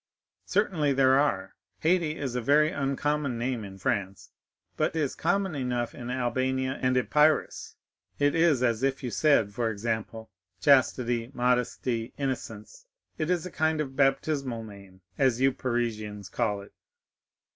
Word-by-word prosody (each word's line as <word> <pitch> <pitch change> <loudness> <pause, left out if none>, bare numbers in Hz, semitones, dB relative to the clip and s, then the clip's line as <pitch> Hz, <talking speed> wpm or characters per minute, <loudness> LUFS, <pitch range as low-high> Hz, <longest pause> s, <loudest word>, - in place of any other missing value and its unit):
"Certainly 175 -8 +1
there 135 0 +4
are. 100 -10 0 0.3
Haydée 165 -2 +2
is 135 -6 -4
a 125 - -1
very 150 +5 +4
uncommon 140 -1 -1
name 120 -1 -2
in 95 -1 -9
France, 95 0 -3 0.4
but - - 0
is 150 -4 0
common 190 +2 0
enough 125 -4 -2
in 120 0 -7
Albania 130 +1 -1
and 130 0 +2
Epirus; 150 +4 +1 0.4
it 145 0 +2
is 165 -6 +3
as 115 -2 +1
if 135 0 -1
you 125 - -3
said, 125 -10 +3
for 115 +1 -1
example, 110 +1 -4 0.3
Chastity, 125 -4 +3
Modesty, 125 -1 0
Innocence,—it 140 - -6
is 180 -2 0
a 185 - -6
kind 160 0 0
of 135 -3 -3
baptismal 135 -3 0
name, 100 -3 -13 0.2
as 130 -3 +3
you 135 +1 +4
Parisians 110 -6 -3
call 105 -4 -1
it." - - -17
130 Hz, 140 wpm, -27 LUFS, 115-145 Hz, 0.4 s, there